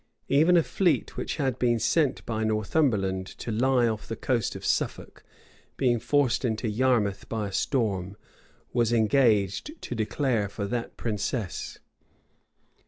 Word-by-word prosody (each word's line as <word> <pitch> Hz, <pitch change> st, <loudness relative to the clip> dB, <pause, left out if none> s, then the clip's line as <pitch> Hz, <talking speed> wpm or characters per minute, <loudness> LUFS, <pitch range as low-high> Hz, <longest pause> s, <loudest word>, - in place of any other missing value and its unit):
Even 160 Hz, +6 st, +5 dB
a 165 Hz, -, +4 dB
fleet 180 Hz, -1 st, 0 dB
which -, -, -3 dB
had 135 Hz, -5 st, -1 dB
been 120 Hz, -1 st, +2 dB
sent 145 Hz, +3 st, +1 dB
by 110 Hz, -1 st, -2 dB
Northumberland 110 Hz, -4 st, 0 dB
to 115 Hz, -, -5 dB
lie 125 Hz, +2 st, +3 dB
off 110 Hz, -1 st, -3 dB
the 115 Hz, -, -4 dB
coast 120 Hz, -4 st, -1 dB
of -, -, -7 dB
Suffolk, -, -, -2 dB, 0.5 s
being 120 Hz, -3 st, +2 dB
forced 130 Hz, +2 st, +1 dB
into 115 Hz, -1 st, -1 dB
Yarmouth 110 Hz, -3 st, +1 dB
by 110 Hz, -3 st, -2 dB
a -, -, -10 dB
storm, 100 Hz, -5 st, -1 dB, 0.6 s
was 120 Hz, -2 st, +2 dB
engaged 115 Hz, -, +2 dB
to -, -, -6 dB
declare 115 Hz, -1 st, 0 dB
for 100 Hz, 0 st, -4 dB
that 120 Hz, +3 st, -4 dB
princess. 105 Hz, -2 st, -3 dB
115 Hz, 140 wpm, -27 LUFS, 105-130 Hz, 0.6 s, Even